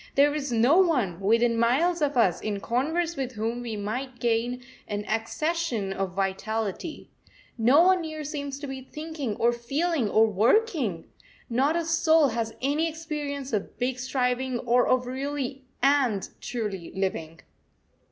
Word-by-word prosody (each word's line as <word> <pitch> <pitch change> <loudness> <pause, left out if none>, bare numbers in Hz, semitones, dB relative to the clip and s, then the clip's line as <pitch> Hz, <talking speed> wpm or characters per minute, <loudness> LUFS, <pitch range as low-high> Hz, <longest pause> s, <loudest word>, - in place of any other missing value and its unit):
There 290 +1 +5
is 290 -3 -3
no 240 +9 +4
one, 250 - +2
within 230 +3 +2
miles 315 +9 +2
of 290 -2 +1
us, 185 -7 +3
in 205 -2 -2
converse 320 +10 -1
with 260 -3 -3
whom 230 +2 -2
we 230 -3 -4
might 245 +5 -4
gain 240 +1 0 0.2
an 205 0 -3
accession 230 - -1
of 195 -2 -3
vitality. 200 - -3 0.4
No 250 +8 +5
one 370 0 +4
near 310 -1 -5
seems 285 -2 -4
to 290 - -5
be 270 -1 -6
thinking, 300 -4 -5
or 235 +1 +3
feeling, 275 +2 -1
or 220 +2 +5
working. 225 - +1 0.5
Not 270 +7 +2
a 340 -1 0
soul 325 -2 +4
has 225 -1 -3
any 300 +4 +1
experience 295 -4 -5
of 205 -2 -2
big 250 +1 -1
striving, 255 0 0
or 245 +1 +3
of 255 -1 +2
really 270 +1 -4 0.2
and 270 -8 +3
truly 210 -8 -4
living. 165 -4 -3
255 Hz, 150 wpm, -26 LUFS, 225-295 Hz, 0.5 s, There